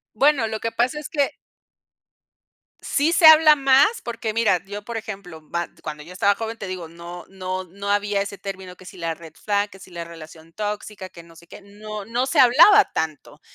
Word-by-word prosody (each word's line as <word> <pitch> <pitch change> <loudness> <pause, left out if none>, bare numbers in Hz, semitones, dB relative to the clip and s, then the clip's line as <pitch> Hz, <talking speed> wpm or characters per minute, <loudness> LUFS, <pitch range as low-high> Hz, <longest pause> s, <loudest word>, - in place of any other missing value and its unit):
Bueno, 275 -1 +3
lo 220 0 -4
que 230 - -3
pasa 250 +6 0
es 300 - -7
que 285 -3 +1 1.5
Sí 295 +3 +1
se 345 -1 +4
habla 310 -1 +9
más, 275 - +4
porque 225 -2 -4
mira, 210 -6 +2
yo, 205 +1 -8
por 235 +2 -7
ejemplo, 195 -7 -7
ma 170 +2 -4 0.2
cuando 150 -1 -6
yo 175 +4 -12
estaba 200 +2 +2
joven, 225 +1 -5
te 200 - -7
digo, 185 -3 -6
no 170 +1 -10
no 185 -1 -5
no 200 +3 -7
había 205 0 +1
ese 200 0 -5
término 190 -2 -8
que 185 - -16
si 185 - -12
la 165 -1 -2
red 160 -1 -13
flag, 205 0 -1
que 195 - -15
si 185 - -14
la 170 -1 -6
relación 165 0 -13
tóxica, 210 -2 -5
que 170 - -13
no 165 0 -18
sé 170 +1 -17
qué. - - -12
No 210 +1 -9
no 240 +4 -1
se 285 +3 0
hablaba 335 - +7
tanto, 155 -3 -4
200 Hz, 210 wpm, -22 LUFS, 175-235 Hz, 1.5 s, habla